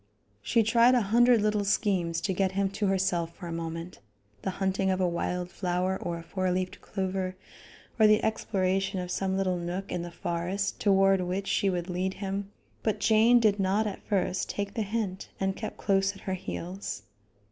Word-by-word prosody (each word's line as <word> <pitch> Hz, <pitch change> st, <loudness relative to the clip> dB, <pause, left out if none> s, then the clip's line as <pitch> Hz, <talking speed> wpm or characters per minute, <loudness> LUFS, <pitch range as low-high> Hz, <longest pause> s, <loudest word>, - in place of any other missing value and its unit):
She 225 Hz, -, +2 dB
tried 235 Hz, +3 st, +5 dB
a 245 Hz, -, +4 dB
hundred 235 Hz, +2 st, +4 dB
little 210 Hz, -1 st, +1 dB
schemes 185 Hz, -5 st, +1 dB
to 190 Hz, -, 0 dB
get 190 Hz, 0 st, 0 dB
him 195 Hz, 0 st, +1 dB
to 205 Hz, +1 st, -1 dB
herself 175 Hz, -3 st, 0 dB
for 180 Hz, -, -9 dB
a 170 Hz, -, -5 dB
moment 165 Hz, +1 st, -5 dB, 0.4 s
the -, -, -2 dB
hunting 190 Hz, 0 st, +1 dB
of 185 Hz, 0 st, +1 dB
a 185 Hz, -, +2 dB
wild 180 Hz, +1 st, -2 dB
flower 185 Hz, 0 st, -1 dB
or 170 Hz, -1 st, -3 dB
a 165 Hz, -, -8 dB
four 185 Hz, +1 st, -2 dB
leaved 185 Hz, 0 st, -2 dB
clover, 190 Hz, -1 st, -3 dB, 0.6 s
or 215 Hz, -, +7 dB
the 215 Hz, +1 st, +4 dB
exploration 195 Hz, -3 st, 0 dB
of 180 Hz, 0 st, -4 dB
some 190 Hz, -1 st, -1 dB
little 185 Hz, -2 st, +1 dB
nook 175 Hz, +3 st, -4 dB
in 175 Hz, -, -2 dB
the 175 Hz, -, -5 dB
forest 175 Hz, +4 st, -2 dB
toward 195 Hz, -2 st, +4 dB
which 185 Hz, +2 st, -2 dB
she 200 Hz, -, +2 dB
would 175 Hz, -2 st, -2 dB
lead 185 Hz, +1 st, -2 dB
him 195 Hz, 0 st, -4 dB, 0.3 s
but 215 Hz, -, 0 dB
Jane 220 Hz, +3 st, +5 dB
did 210 Hz, -3 st, +3 dB
not 195 Hz, +3 st, +2 dB
at 205 Hz, -2 st, -4 dB
first 190 Hz, -2 st, -1 dB
take 200 Hz, 0 st, -3 dB
the 225 Hz, -, -2 dB
hint 205 Hz, -3 st, -3 dB
and 195 Hz, 0 st, 0 dB
kept 215 Hz, -, -6 dB
close 195 Hz, 0 st, +2 dB
at 195 Hz, -, -13 dB
her 190 Hz, -, -3 dB
heels. 185 Hz, -, -5 dB
190 Hz, 190 wpm, -28 LUFS, 180-200 Hz, 0.6 s, or